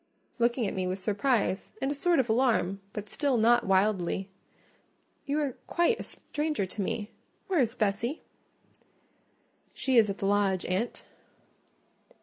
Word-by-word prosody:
looking 235 0 +2
at 195 - -2
me 185 -1 -1
with 185 +1 -2
surprise 205 0 0
and 270 - -1
a - - +1
sort 340 +4 +2
of 260 - +2
alarm, 220 -5 +2
but 210 -1 -6
still 280 +2 0
not 235 0 +4
wildly. 190 -1 +1 1.0
"You 285 +1 0
are 290 -3 0 0.2
quite 355 +7 +2
a - - -4
stranger 300 -7 -3
to 195 +3 -5
me—where 230 - -4
is 235 -2 +1
Bessie?" 220 +7 -1 1.5
"She 265 -2 +1
is 220 -2 +6
at 195 - -3
the - - -3
lodge, 195 -2 +2
aunt." 190 +7 -2
220 Hz, 140 wpm, -29 LUFS, 195-265 Hz, 1.5 s, is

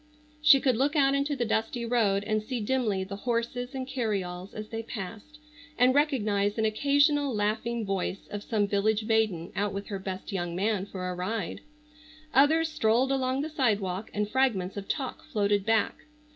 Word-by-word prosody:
She 300 -2 +7
could 260 -4 +2
look 280 +5 +1
out 275 -2 +4
into 280 +1 0
the 240 -3 -1
dusty 225 +2 -1
road 215 -5 +2
and 215 0 0
see 240 +3 -4
dimly 215 -4 0
the 200 +1 -6
horses 245 +3 -2
and 260 -1 -3
carryalls 200 -8 -3
as 215 0 -6
they 225 0 -4
passed, 225 +6 -8 0.4
and 250 +1 +5
recognize 215 -9 +1
an 220 - +2
occasional 285 +3 +2
laughing 220 +2 -1
voice 195 -1 -3
of 205 - -4
some 205 -2 0
village 210 +2 +1
maiden 215 -7 +1
out 205 0 -1
with 200 +1 -5
her 200 -2 -3
best 190 +1 -6
young 175 -3 -3
man 200 +1 0
for 185 -2 -5
a 180 - -2
ride. 185 +2 -3 0.7
Others 315 +4 +4
strolled 255 -3 +2
along 265 0 0
the 300 - -2
sidewalk, 210 - 0
and 210 0 -1
fragments 210 -7 +1
of 200 -1 -6
talk 270 -4 -3
floated 205 -7 0
back. 225 -1 +2
220 Hz, 175 wpm, -28 LUFS, 200-260 Hz, 0.7 s, She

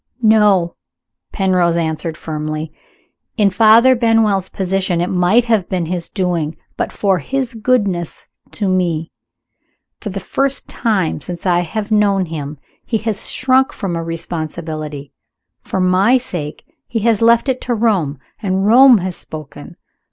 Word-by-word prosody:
"No!" 210 -6 +3 0.5
Penrose 180 -4 +1
answered 160 -1 -2
firmly. 155 -1 -5 0.6
"In 205 -3 +3
Father 225 +5 +6
Benwell's 225 -5 +2
position 190 -2 -1
it 175 - -1
might 185 +6 +3
have 220 -6 +1
been 180 -3 -1
his 175 0 -4
doing, 170 -5 -2 0.2
but - - -2
for 195 -3 +1
his 260 - -3
goodness 205 -7 -1 0.3
to 205 - -2
me. 175 -4 0 0.9
For 210 - -6
the 195 0 -4
first 275 +8 -1
time 195 -10 -1
since 175 +2 -7
I 175 -2 +3
have 205 +5 -4
known 200 -3 +2
him 150 -3 -6 0.3
he 225 - -1
has 215 -3 -2
shrunk 260 +1 +2
from 190 -5 -4
a 165 - -3
responsibility. 155 -3 -5 0.5
For 190 - -4
my 185 +7 +4
sake 175 - -6 0.2
he 230 -3 -2
has 225 -1 +2
left 230 +3 +4
it 260 -1 -1
to 245 - -1
Rome. 195 -11 0 0.2
And 190 -2 0
Rome 250 +3 +7
has 185 -2 -3
spoken. 155 -3 -9
190 Hz, 145 wpm, -17 LUFS, 170-225 Hz, 0.9 s, Rome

